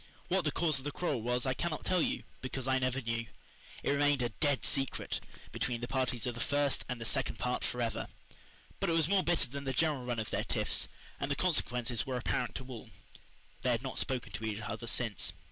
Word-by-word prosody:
What 185 -2 +2
the 150 - +3
cause 155 -4 +3
of - - -10
the 145 - -2
quarrel 145 -7 0
was 125 +2 +1
I 130 - +2
cannot 160 +3 -2
tell 180 -2 +4 0.4
because 130 0 -2
I 130 0 +4
never 130 +1 +1
knew. 115 -1 -1 0.6
It - - +2
remained 145 -2 +4
a 120 - +1
"dead 145 +4 +1
secret" 135 -3 0 0.3
between 120 -2 -1
the 120 - -3
parties 130 -3 0
of 125 - 0
the 120 - -7
first 145 0 +2
and 120 -2 -3
second 135 +3 +1
part 125 0 0
forever. 120 -2 -1 0.7
But - - +1
it - - +3
was 165 -2 +4
more 195 +1 +5
bitter 170 -5 +2
than 140 +3 -5
the 135 - 0
general 150 -1 +2
run 120 -1 -1
of 110 -1 -2
their - - +1
tiffs, - - +2 0.3
and 140 - -1
the 140 - +2
consequences 125 - +1
were 130 -1 -2
apparent 125 0 0
to 130 - -4
all. 125 -4 -8 0.7
They 130 - +2
had 120 0 +2
not 130 - -2
spoken 130 -2 -1
to 110 - -5
each 110 -1 -2
other 110 +2 -4
since. 105 -8 +1
130 Hz, 215 wpm, -33 LUFS, 120-145 Hz, 0.7 s, more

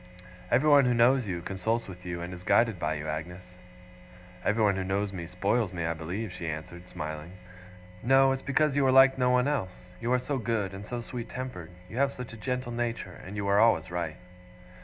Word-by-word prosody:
Everyone 140 +2 +5
who 125 -1 +2
knows 120 0 +4
you, 85 -3 -3
consults 110 +6 -1
with 90 -1 -10
you, 85 -1 -4
and 90 +1 -5
is 90 - -9
guided 115 -1 +3
by 75 -1 -1
you, 75 0 -5
Agnes.' 90 +4 -6 0.9
'Everyone 105 -2 +2
who 95 - -2
knows 100 +1 -1
me, 85 -3 -5
spoils 100 +4 0
me, 85 -3 -3
I 85 - 0
believe,' 90 +7 -5
she 85 - -6
answered, 85 +3 -7
smiling. 75 +2 -6 0.7
'No. 135 +2 +5
It's 135 0 -2
because 140 +1 +1
you 145 - +3
are - - +5
like 135 0 +6
no 125 0 +3
one 125 +1 +3
else. 95 -10 -3
You 120 +4 -2
are - - +5
so 135 +2 -2
good, 110 -5 -1
and 100 +2 -8
so 120 -1 -4
sweet 120 0 -6
tempered. 130 -10 -6 0.2
You 110 - -9
have 140 +1 +2
such 125 -2 -8
a - - -9
gentle 125 +2 -3
nature, 115 -5 -3
and 100 +3 -8
you 100 -1 -2
are 100 +1 +3
always 110 -6 +3
right. 85 -3 -3
105 Hz, 210 wpm, -28 LUFS, 90-125 Hz, 0.9 s, like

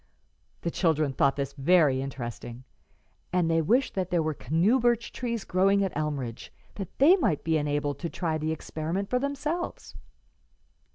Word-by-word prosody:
The 170 - -2
children 155 -6 +1
thought 140 0 +2
this 140 -1 -3
very 145 -2 +3
interesting, 120 -2 -6 0.7
and 175 -2 +1
they 165 0 +3
wished 245 - +2
that 185 -2 -2
there 175 -3 +1
were 155 0 -1
canoe 165 - +2
birch 235 -1 +1
trees 235 -4 -3
growing 195 +2 +2
at 190 - -3
Elmridge, 140 -6 -3 0.2
that 195 -4 -8
they 310 +8 +7
might 205 - 0
be 160 0 +1
enabled 145 -1 -1
to 170 - -3
try 160 -3 -2
the 155 +1 -1
experiment 160 +5 -4
for 250 - +2
themselves. 290 +5 -3
165 Hz, 160 wpm, -27 LUFS, 145-200 Hz, 0.7 s, they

